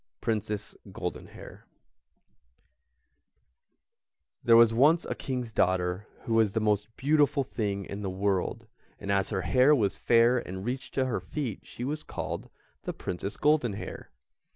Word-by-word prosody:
PRINCESS 105 -2 -2 0.2
GOLDENHAIR - - -7 2.8
There 115 -1 +7
was 115 -1 +7
once 150 +8 +4
a - - -2
King's 125 -4 -4
daughter 90 +1 +1 0.2
who 115 - -2
was 110 -3 +3
the - - +1
most 105 -1 +1
beautiful 145 0 +3
thing 100 -6 -3
in 100 +1 -6
the 100 - -2
world, 95 -1 -1 0.3
and 100 - -4
as 100 -1 +1
her 95 -4 -1
hair 130 +7 +5
was 105 -7 0
fair 120 +1 +4
and 95 -2 -7
reached 130 +2 -4
to 130 - +2
her 130 - -1
feet 130 -10 -5
she 120 - -7
was 150 +4 -2
called - - -5 0.3
the - - -4
Princess 95 +4 -5
Goldenhair. 145 -9 0
115 Hz, 140 wpm, -28 LUFS, 100-130 Hz, 2.8 s, There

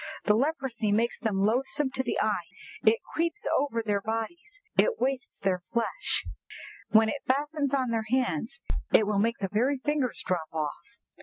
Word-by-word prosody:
The 210 - +4
leprosy 260 -4 0
makes 230 +3 +1
them 200 -4 +1
loathsome 265 +5 +1
to 260 - -1
the 240 - -2
eye; 205 -6 0 0.4
it 220 +1 +4
creeps 335 +1 0
over 265 -5 0
their 205 -2 0
bodies; 330 - -4 0.2
it 480 -2 +3
wastes 260 -1 -1
their 190 -2 0
flesh; 235 - -1 0.6
when 220 0 +6
it 280 +5 -2
fastens 285 +1 +1
on 255 -3 0
their 225 -1 0
hands, 250 - 0 0.3
it 215 - +6
will 205 -1 +1
make 230 +3 +2
the 195 - -2
very 255 +6 +2
fingers 280 -2 -1
drop 175 -4 -1
off!" 160 - -4
235 Hz, 165 wpm, -28 LUFS, 215-275 Hz, 0.6 s, when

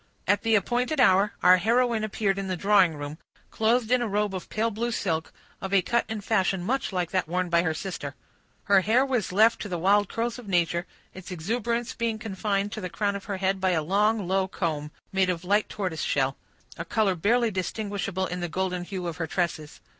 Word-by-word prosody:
At 205 +2 +3
the 225 -1 +2
appointed 245 - 0
hour, 200 -3 +4
our 180 +1 +8
heroine 230 +3 +2
appeared 200 -2 0
in 195 - -4
the 185 -1 -2
drawing 195 -3 +4
room, 145 +2 -7 0.3
clothed 225 +1 +1
in 250 -1 +4
a 240 - 0
robe 205 -1 0
of 185 - -6
pale 225 +1 0
blue 235 +3 -2
silk, 165 -8 -2 0.3
of 190 +1 -1
a 190 - +4
cut 235 +5 +1
and 215 -2 -4
fashion 190 -4 +1
much 255 +4 -1
like 180 -3 -2
that 185 -3 0
worn 180 +2 -1
by 170 0 +4
her 160 -2 -1
sister. 155 -6 -5 0.5
Her 200 -2 +4
hair 230 +7 +3
was 250 -8 -1
left 220 +5 +4
to 205 - -5
the 175 - -2
wild 200 +3 +3
curls 235 +2 -2
of 240 - -11
nature, 175 -1 +1 0.3
its 190 0 -10
exuberance 230 +7 -2
being 230 -1 -1
confined 205 -1 -2
to 215 - -5
the 180 - -4
crown 200 +3 -1
of 200 - -7
her 200 -2 -3
head 190 0 0
by 185 -1 +2
a 160 -2 0
long, 205 +3 +1
low 190 0 +1
comb, 155 -5 -3 0.2
made 190 -1 +2
of 175 -1 -2
light 205 +3 +2
tortoise 185 -7 -3
shell; 135 -1 0 0.4
a - - -2
color 205 +2 +1
barely 225 +7 +2
distinguishable 195 0 -2
in 180 0 -4
the 175 -1 -3
golden 180 0 -2
hue 180 0 -5
of 170 -2 -4
her 165 - -2
tresses. 160 -3 -3
195 Hz, 215 wpm, -26 LUFS, 180-220 Hz, 0.5 s, our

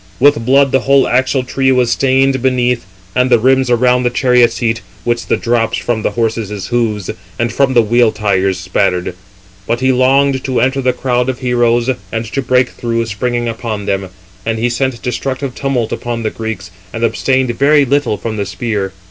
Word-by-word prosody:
With 145 -2 +4
blood 135 +2 +3
the 135 - +3
whole 135 0 +3
axletree 130 +1 +1
was 125 -2 +2
stained 135 0 +2
beneath, 125 -4 0 0.3
and 125 0 +2
the 120 - +5
rims 130 +2 +2
around 125 +1 +3
the 125 - +1
chariot 125 -1 +3
seat, 115 -2 -1 0.2
which 120 0 -1
the - - +1
drops 115 -1 0
from 115 -2 -2
the - - 0
horses' 110 -3 -3
hoofs, 110 -5 -1 0.3
and 115 -1 -1
from 135 -1 +1
the 120 - +5
wheel 120 +1 +3
tires, 95 -3 0
spattered. 90 -1 -1 0.5
But 120 - 0
he 130 +1 +2
longed 130 +1 +2
to 130 -2 0
enter 130 +2 +1
the 130 0 +2
crowd 125 0 -1
of 130 - -2
heroes, 120 -1 +1 0.2
and 115 0 -3
to 130 +5 -3
break 125 0 +2
through, 115 -1 -2
springing 120 +2 -2
upon 110 -3 -4
them. 95 -1 -2 0.3
And 115 +1 -2
he 120 +2 0
sent 130 -1 -1
destructive 130 +2 -3
tumult 130 -5 -2
upon 120 -1 -4
the 110 - -1
Greeks, 110 -5 -6 0.2
and 115 - -5
abstained 130 +2 +1
very 145 +1 +4
little 140 -4 0
from 110 0 -5
the 100 - -2
spear. 105 -5 -3
120 Hz, 185 wpm, -15 LUFS, 115-130 Hz, 0.5 s, the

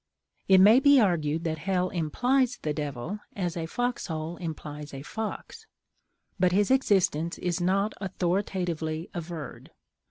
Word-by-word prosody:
It 190 - +7
may 215 +6 +8
be 285 0 +6
argued 165 -6 +1
that 160 -2 -2
hell 180 +2 0
implies 245 - +1
the 150 - -1
Devil, 150 +6 -4 0.2
as 180 -3 -2
a 165 -2 -3
fox 245 +7 -2
hole 160 0 -4
implies 150 -3 -7
a 135 - -7
fox; 225 - -6 0.7
but 180 0 +3
his 205 +5 +2
existence 185 - +2
is 175 0 -2
not 195 +4 +1
authoritatively 175 -4 -2
averred. 170 -3 -7
175 Hz, 135 wpm, -27 LUFS, 160-200 Hz, 0.7 s, may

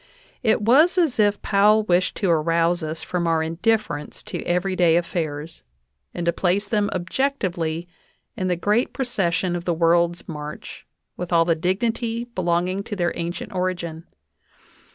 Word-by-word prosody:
It 220 -3 +2
was 300 - +5
as 320 -10 +2
if 205 -1 +3
Powell 210 +2 +4
wished 185 -2 +1
to 195 - 0
arouse 165 +2 +2
us 155 0 -5
from 175 -2 -2
our 165 -1 +2
indifference 165 -2 -1
to - - -5
every 180 +2 0
day 170 -3 +4
affairs, 165 -3 -3 0.5
and 175 - -4
to 170 - +2
place 195 +3 0
them 205 -1 +1
objectively 180 - -2 0.5
in 185 -5 -2
the 180 - +1
great 210 +7 +1
proces 205 -10 0
sion 180 -1 -1
of 175 0 -5
the 175 - 0
world's 170 +1 +2
march, 150 -1 -8 0.3
with 180 0 -5
all 165 -1 +4
the 170 - +3
dignity 225 +7 -1
belonging 185 -3 -1
to 210 - -5
their 175 -3 0
ancient 175 +4 -5
origin. 175 -3 -3
180 Hz, 155 wpm, -23 LUFS, 170-205 Hz, 0.5 s, was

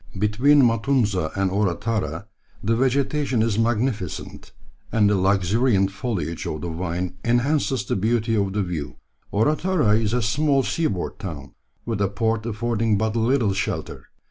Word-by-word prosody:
Between 125 +8 +4
Matunza 115 - +1
and 95 -1 0
Orotara 100 -3 -1 0.4
the 115 +3 +1
vegetation 135 0 +1
is 110 -2 0
magnificent, 115 - -2 0.4
and 105 -2 +3
the 105 - +3
luxuriant 95 +2 +2
foliage 95 -7 -3
of 75 - -4
the 85 - -4
vine 90 +2 -3
enhances 130 +3 +1
the - - -1
beauty 115 +3 0
of 100 -2 0
the 105 0 0
view. 85 -6 -5 0.4
Orotara 150 - +2
is 110 0 -1
a 125 -1 +1
small 135 +5 +2
seaboard 110 - -2
town, 75 -7 -7 0.3
with 115 -3 -2
a 100 - +3
port 110 +3 -1
affording 115 -1 0
but 110 +1 -1
little 115 -2 +2
shelter. 100 +3 -4
110 Hz, 145 wpm, -23 LUFS, 95-120 Hz, 0.4 s, Between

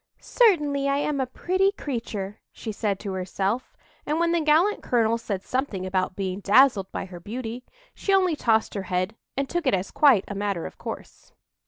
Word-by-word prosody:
"Certainly 295 - +2
I 275 - +2
am 290 0 -1
a 260 - -1
pretty 375 +8 +1
creature," 225 - -5
she 225 - -6
said 205 -2 -1
to 200 - -4
herself; 190 +5 -2 0.3
and 305 +2 -1
when 340 0 +2
the 340 -1 +2
gallant 320 +7 +3
colonel 230 -1 +1
said 200 -4 -4
something 255 -8 -2
about 185 0 -1
being 190 -1 -3
dazzled 205 -1 +4
by - - -4
her 180 -2 -10
beauty, 235 +5 -6 0.3
she 395 - -2
only 370 -4 +4
tossed 225 -6 +1
her 200 - -2
head 185 +4 -1 0.2
and 275 0 0
took 345 -1 -2
it 230 - +4
as 185 +1 -4
quite 265 -10 +5
a - - -5
matter 200 -4 -2
of - - -9
course. - - -8
230 Hz, 190 wpm, -25 LUFS, 195-295 Hz, 0.3 s, quite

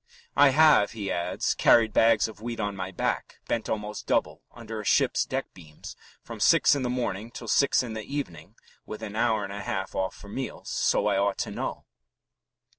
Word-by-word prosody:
"I 145 - +7
have," 150 -7 +5
he 105 -4 -4
adds, 85 +1 -1
"carried 115 -2 +4
bags 115 -2 +4
of 110 -1 -12
wheat 115 0 -5
on 100 -1 -2
my 95 -1 -4
back, 90 - -3
bent 115 -2 -2
almost 105 -1 -4
double - - 0
under 110 -2 -7
a - - -10
ship's - - +2
deck - - -4
beams, 75 -4 -12 0.3
from - - -9
six - - +5
in 140 - -1
the 125 - -1
morning 115 -4 -3
till 120 0 -9
six 140 +2 +3
in 115 -3 -6
the 110 - -4
evening 105 - -6 0.3
(with 110 +1 -8
an 105 -1 -6
hour 110 -1 +1
and 100 - -6
a 100 - -5
half 95 -1 -4
off 95 0 -2
for 100 - -13
meals), 130 +6 -6
so - - +1
I - - +2
ought 100 0 +1
to - - -3
know." - - -5
110 Hz, 200 wpm, -27 LUFS, 100-115 Hz, 0.3 s, I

